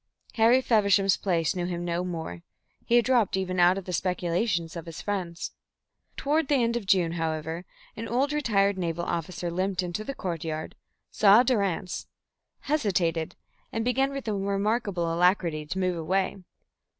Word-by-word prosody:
Harry 235 +3 +5
Feversham's 200 -5 +3
place 170 -4 0
knew 175 -1 -2
him 175 -1 -3
no 170 +1 -1
more; 160 - -5 0.4
he 235 - +2
had 240 -2 +5
dropped 240 -7 +2
even 185 -1 -2
out 175 +2 +5
of 195 - -5
the 180 - -5
speculations 175 0 -1
of 170 -1 -7
his 165 - -7
friends. 180 -4 -3 0.7
Toward 300 +1 +1
the 290 - +3
end 235 0 +1
of 225 -5 -3
June, 180 -4 +3
however, 160 +1 -3 0.3
an 230 +1 -5
old 270 +5 +1
retired 200 -9 +2
naval 170 -1 -2
officer 170 +1 -3
limped 185 +1 -1
into 180 +4 -4
the 275 +5 -5
courtyard, 160 -5 -4 0.4
saw 210 +3 +6
Durrance, 200 -7 -1 0.5
hesitated, 180 - 0 0.4
and 225 0 -2
began 265 +2 +2
with 275 -3 -6
a 215 - 0
remarkable 200 -3 0
alacrity 170 -3 +2
to 185 - -4
move 185 -2 0
away. 190 +4 0
185 Hz, 160 wpm, -27 LUFS, 170-220 Hz, 0.7 s, saw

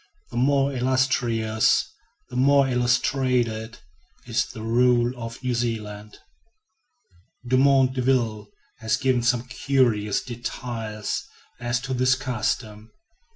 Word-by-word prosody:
The 120 - -5
more 140 +2 +2
illustrious, 125 -4 +1 0.4
the - - -7
more 140 +2 +4
illustrated, 125 -2 0 0.5
is - - 0
the 110 - -9
rule 120 +1 +3
of 115 +1 -8
New 125 -1 0
Zealand. 105 -3 -4 1.3
Dumont 130 +1 +4
D'Urville 120 -5 0 0.3
has 110 -1 0
given 130 +1 +1
some 120 0 +1
curious 125 -5 +1
details 115 -3 -5 0.4
as 120 0 -1
to 135 -1 -4
this 130 +1 +3
custom. 110 -4 -3
120 Hz, 105 wpm, -24 LUFS, 110-130 Hz, 1.3 s, more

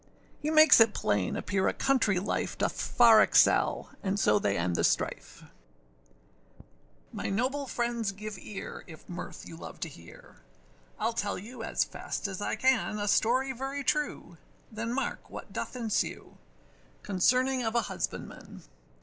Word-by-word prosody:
He 300 - -2
makes 310 -3 +7
it 225 -2 +5
plain 100 -3 0
appear 190 -1 0
a - - +1
country 240 -8 +2
life 195 - -2
Doth - - 0
far 230 -3 +6
excel: - - +3
and 200 0 -1
so 105 - +4
they 100 -1 0
end 85 0 -1
the - - 0
strife. - - -1 1.7
MY - - -3
noble 265 +7 -1
friends 235 -4 -1
give 210 +2 -7
ear, 200 +2 -8
if 160 -3 -13
mirth 175 0 -8
you 165 - -9
love 165 - -10
to 165 - -3
hear, 85 - -15 0.6
Iâll 230 - 0
tell 205 -3 -2
you 230 +7 -9
as - - 0
fast - - -5
as 195 0 -6
I - - -1
can, 250 -2 +1
A 205 0 -2
story 255 +6 +2
very 270 +2 -4
true, 300 +1 -2 0.3
then 225 +1 -4
mark 270 +3 -3
what - - -9
doth - - -4
ensue, 230 -4 -3 0.6
Concerning 255 +7 +2
of 225 -1 -2
a 235 - +4
husbandman. - - -6
220 Hz, 155 wpm, -29 LUFS, 195-255 Hz, 1.7 s, makes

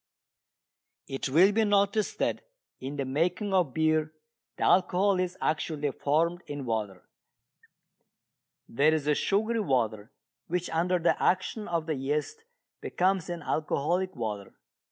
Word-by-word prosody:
It 135 0 -3
will 175 +9 +6
be 220 +2 +2
noticed 205 0 +1
that - - -1 0.4
in 135 +3 -6
the 140 -2 -2
making 175 +9 -1
of 175 -8 +2
beer 155 -1 +2 0.5
the - - -2
alcohol 185 +1 +3
is 185 0 -2
actually 150 -2 -1
formed 165 +6 0
in 145 -2 -5
water. 105 -5 -3 1.6
There 150 +6 +3
is 150 -3 -2
a 150 - +3
sugary 220 +8 0
water 115 - -1 0.4
which 180 +1 -2
under 175 +3 +1
the 170 0 +1
action 195 +3 0
of 170 -2 -1
the 160 - -1
yeast 150 - -3 0.4
becomes 185 -1 0
an 170 -3 -5
alcoholic 170 +5 -1
water. 105 -5 -5
160 Hz, 135 wpm, -28 LUFS, 140-185 Hz, 1.6 s, will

